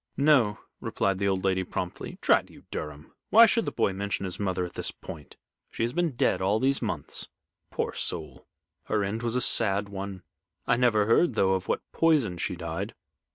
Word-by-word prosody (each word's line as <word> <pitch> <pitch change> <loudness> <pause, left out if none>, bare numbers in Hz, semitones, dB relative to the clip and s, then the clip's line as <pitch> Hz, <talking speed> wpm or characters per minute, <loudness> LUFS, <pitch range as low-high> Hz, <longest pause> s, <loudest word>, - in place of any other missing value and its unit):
"No," 140 -8 +4 0.2
replied 95 -1 -1
the 100 - +1
old 95 -1 0
lady, 95 -1 +1
promptly. 90 0 -5
"Drat - - +3
you, - - -16
Durham! 75 0 -6 0.2
why 230 +2 +9
should 230 0 +2
the - - -2
boy 105 -4 +1
mention 100 0 -2
his 90 - -5
mother 95 -3 -1
at 90 - -9
this - - -2
point? 75 -4 -10 0.3
She - - -3
has 120 +1 -1
been 175 -2 0
dead - - +1
all 100 +3 +2
these 135 +3 +2
months. 90 - -2 0.4
Poor - - -2
soul! - - -3 0.4
her 105 -2 0
end 105 +3 -2
was 120 0 -1
a 125 - +2
sad 100 -4 +2
one. 100 -1 -6 0.4
I - - +3
never 120 -4 +3
heard, 115 +10 +3
though, 95 0 +3
of 95 -1 -2
what - - -1
poison 140 - +2
she 90 - -2
died." 85 +4 -5
100 Hz, 195 wpm, -27 LUFS, 95-120 Hz, 0.4 s, why